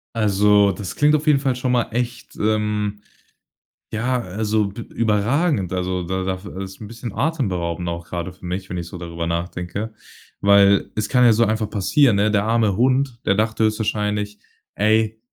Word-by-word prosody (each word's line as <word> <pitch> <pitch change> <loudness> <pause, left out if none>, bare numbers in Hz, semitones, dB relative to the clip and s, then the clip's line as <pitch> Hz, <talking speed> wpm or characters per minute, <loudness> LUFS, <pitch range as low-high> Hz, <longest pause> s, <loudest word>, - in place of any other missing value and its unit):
Also, 105 -1 +4
das 95 +1 -6
klingt 150 +1 +4
auf 155 - -1
jeden 150 -3 +4
Fall 135 -3 0
schon 125 0 -1
mal 120 -2 +3
echt 120 +1 -4
ähm, 105 -1 -1 0.9
ja, 125 +3 0
also, 105 +1 -1
b 110 +4 -8
überragend, 110 - +1
also, 90 0 -1
da 95 +2 -2
da 95 0 -1
f 95 +2 -12
ist 95 -1 -7
'n 105 - -8
bisschen 115 -1 -7
atemberaubend 90 - -1
auch 85 0 -5
grade 85 +1 -4
für 90 - -14
mich, 95 +2 -4
wenn 90 - -4
ich 85 -1 -5
so 90 - -8
darüber 85 -1 -5
nachdenke. 90 +5 -3 0.5
Weil 100 -1 +4
es 105 - -2
kann 125 -1 +4
ja 115 - +7
so 115 +2 +3
einfach 110 0 0
passieren, 115 +4 +3
ne? 105 +1 +3
Der 105 -1 +2
arme 110 -3 +1
Hund, 130 0 +1
der - - +3
dachte 110 +1 0
höchstwahrscheinlich: 105 -1 -1 0.4
„Ey, 110 +1 +2
105 Hz, 180 wpm, -21 LUFS, 95-115 Hz, 0.9 s, ja